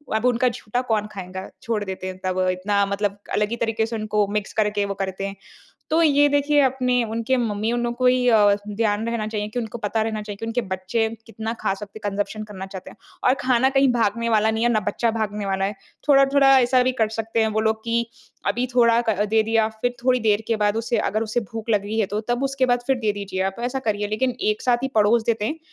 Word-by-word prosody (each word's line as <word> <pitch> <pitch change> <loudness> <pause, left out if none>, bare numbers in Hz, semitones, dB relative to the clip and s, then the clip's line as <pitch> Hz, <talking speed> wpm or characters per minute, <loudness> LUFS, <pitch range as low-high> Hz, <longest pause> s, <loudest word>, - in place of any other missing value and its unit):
अब 220 - 0
उनका 250 0 +3
झूठा 235 +1 -3
कौन 220 -4 -1
खाएगा? 185 -1 -7
छोड़ 225 -2 -2
देते 190 -1 -5
हैं 185 0 -6
तब 185 0 -1
इतना 200 +2 0
मतलब 200 0 -2 0.2
अलग 210 0 +1
ही 235 - -2
तरीके 225 -1 0
से 230 +1 -5
उनको 215 -1 0
मिक्स 205 0 -3
करके 210 -1 +1
वो 200 - -3
करते 190 0 -3
हैं। 195 - -7 0.6
तो 320 +2 +3
ये 290 -2 +5
देखिए 290 +1 +3
अपने 250 -2 +2
उनके 230 +3 -1
मम्मीयों 225 -1 -1
नो 240 0 -1
को 250 +1 -1
ही 250 0 +4
अ, 210 -3 +5
ध्यान 210 +1 0
रहना 230 -2 -2
चाहिए 210 -1 -3
कि 215 - -5
उनको 235 0 -4
पता 220 0 -1
रहना 220 -1 -2
चाहिए 210 -1 -7
कि 225 - -6
उनके 230 +2 0
बच्चे 205 +5 -1 0.2
कितना 225 -1 -5
खा - - 0
सकते 205 +1 -9
हैं 205 -1 -3
कंजम्पशन 205 +2 -3
करना 195 -3 -8
चाहते 190 -1 -9
हैं। - - -16 0.3
और 255 - +5
खाना 255 0 +3
कहीं 270 0 +4
भागने 230 0 0
वाला 220 -1 +3
नहीं 220 +1 -1
है, 240 - +3
ना 215 - +2
बच्चा 230 +3 0
भागने 210 -2 -3
वाला 195 0 0
है। 200 +2 -2 0.3
थोड़ा-थोड़ा 275 -1 +6
ऐसा 250 0 +3
भी 255 +1 +1
कर 220 - +3
सकते 225 +1 -2
हैं 220 - +3
वो 215 - +1
लोग 220 0 0
कि, 235 0 0 0.4
अभी 245 +1 +1
थोड़ा 235 -2 +4
क 210 -1 +2
दे 220 0 +4
दिया 220 0 +2
फिर 245 +1 0
थोड़ी 255 -1 +4
देर 215 -1 +2
के 230 - +1
बाद 210 0 +1
उसे 230 +1 -1
अगर 215 +1 0
उसे 225 +2 -1
भूख 225 0 -7
लग 210 -3 +3
रही 215 +2 -3
है 220 - +3
तो 205 +2 -2
तब 240 +2 0
उसके 270 -1 +1
बाद 245 0 +3
फिर 270 - +2
दे 220 -3 0
दीजिए 200 -2 -5
आप 195 - -4
ऐसा 250 +2 -1
करिए। 205 -1 0
लेकिन 220 +5 0
एक 215 0 0
साथ 245 -1 +3
ही 265 - 0
पड़ोस 220 +2 +4
देते 225 -2 0
हैं। 305 +9 -2
220 Hz, 245 wpm, -23 LUFS, 205-240 Hz, 0.6 s, थोड़ा-थोड़ा